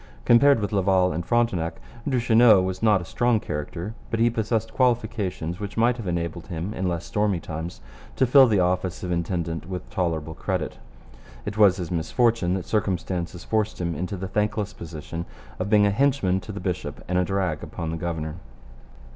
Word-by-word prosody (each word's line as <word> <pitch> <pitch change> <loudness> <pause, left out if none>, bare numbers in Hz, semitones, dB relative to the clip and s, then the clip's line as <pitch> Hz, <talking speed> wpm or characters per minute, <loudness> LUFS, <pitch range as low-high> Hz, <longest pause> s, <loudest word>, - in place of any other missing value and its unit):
Compared 135 +3 +6
with 105 - -2
Laval 95 -3 +3
and 85 +3 -2
Frontenac, 95 -8 +1 0.3
Duchesneau 120 -4 +5
was 95 0 -3
not 105 -4 +4
a - - -7
strong 120 +4 +1
character, 85 +5 -5 0.2
but 115 - -1
he 115 +1 +4
possessed 110 0 -1
qualifications 110 -8 0
which 105 0 -6
might 120 +2 +3
have 115 -5 -6
enabled 85 0 -3
him 90 +3 -4
in 95 -3 -1
less 85 -1 -3
stormy 105 -4 0
times 80 -5 -6 0.3
to 130 - +3
fill 130 +1 +7
the 105 -4 +2
office 90 0 0
of 90 - -3
intendant 85 -1 -2
with 90 -2 -5
tolerable 80 -5 -1
credit. - - -3 0.7
It 105 - -4
was 100 -4 +5
his 90 -2 -5
misfortune 90 +2 +1
that 95 - -4
circumstances 90 -4 -2
forced 110 -1 -1
him 85 -1 -1
into 90 +5 -4
the 95 +1 -4
thankless 105 +1 -1
position 85 +1 -7 0.3
of - - -2
being 105 -1 +5
a 100 - +3
henchman 115 -6 +2
to 105 - -8
the 100 - -6
bishop 90 -5 -4
and 90 0 +1
a - - +3
drag 90 -5 -1
upon 80 -1 -5
the - - -2
governor. 80 -2 -4
95 Hz, 180 wpm, -25 LUFS, 85-110 Hz, 0.7 s, fill